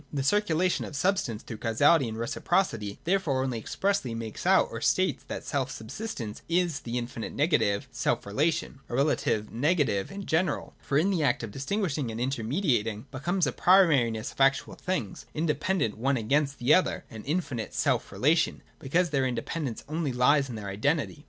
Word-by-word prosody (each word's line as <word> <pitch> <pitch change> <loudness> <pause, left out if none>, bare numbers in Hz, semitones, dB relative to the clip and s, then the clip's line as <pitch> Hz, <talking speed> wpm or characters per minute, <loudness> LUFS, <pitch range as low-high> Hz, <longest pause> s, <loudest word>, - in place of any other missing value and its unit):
The 140 -2 -2
circulation 185 0 +2
of 150 - -7
substance 145 - 0
through 115 - -7
causality 130 +6 +3
and 110 - -6
reciprocity 115 - -1
therefore 165 -8 +1
only 125 -3 -2
expressly 165 - -1
makes 115 -2 -5
out - - +5
or - - -5
states - - +1
that - - -5
self - - -1
subsistence 110 - -6
is 170 -3 +1
the 120 +1 -4
infinite 120 -1 -5
negative 140 - +1
self - - -1
relation— 140 +6 -1
a - - -3
relation 130 -6 +1
negative, 135 - +1
in 200 0 -6
general, 160 -1 0
for 140 - 0
in 190 +6 +3
it - - +1
the 160 - 0
act 140 - +1
of 110 - -5
distinguishing 145 - -2
and 110 0 -5
intermediating 120 - 0
becomes 170 +7 0
a 130 - 0
pri 190 +8 +6
mariness 120 -8 +1
of - - -6
actual 135 0 +3
things 180 - -4
independent 155 - 0
one 135 +3 +1
against 140 +5 +1
the 125 +5 +4
other, 185 - +2
— - - -34
and 110 -1 -8
infinite 140 - -2
self - - 0
relation, - - +1 0.2
because 170 +5 +1
their 135 -3 +1
independ 135 +6 -3
ence 115 - -6
only 155 -1 -2
lies 135 +3 +3
in 120 - -5
their 105 -2 -5
identity. 145 +10 -1
140 Hz, 180 wpm, -28 LUFS, 115-165 Hz, 0.2 s, pri